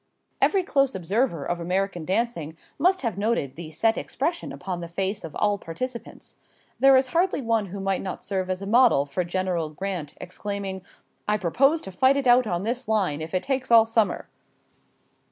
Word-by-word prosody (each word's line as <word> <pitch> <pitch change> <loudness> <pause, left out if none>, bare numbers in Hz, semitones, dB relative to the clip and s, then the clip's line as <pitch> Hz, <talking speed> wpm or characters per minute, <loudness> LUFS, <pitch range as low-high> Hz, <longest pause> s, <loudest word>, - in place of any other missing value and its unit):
Every 390 -2 +3
close 275 -5 +1
observer 190 - 0
of 175 0 -2
American 180 0 -1
dancing 185 -6 -1 0.2
must 370 -2 +3
have 225 -5 -2
noted 200 - 0
the 165 -1 -8
set 225 +8 +1
expression 335 +6 -3
upon 180 -2 -5
the 170 - -5
face 195 +4 -2
of 160 - -8
all 205 -1 +1
participants. 235 +9 -7 0.4
There 270 0 +7
is 260 0 +1
hardly 350 +3 +1
one 225 -5 0
who 195 +2 -7
might 195 -1 -1
not 185 - -6
serve 190 -2 -2
as 185 +1 -2
a - - -4
model 230 - +4
for 145 +6 -2
General 175 -2 -1
Grant 170 -2 -5
exclaiming: 195 0 -5 0.5
"I 210 0 +2
propose 275 - +2
to 190 - -7
fight 260 +9 +3
it 275 - -1
out 245 -1 +5
on 175 -1 -1
this 240 +3 -3
line 190 -9 0
if 160 +4 -5
it 185 - 0
takes 265 -1 -2
all 230 -1 +7
summer." 225 -2 0
200 Hz, 185 wpm, -25 LUFS, 175-245 Hz, 0.5 s, There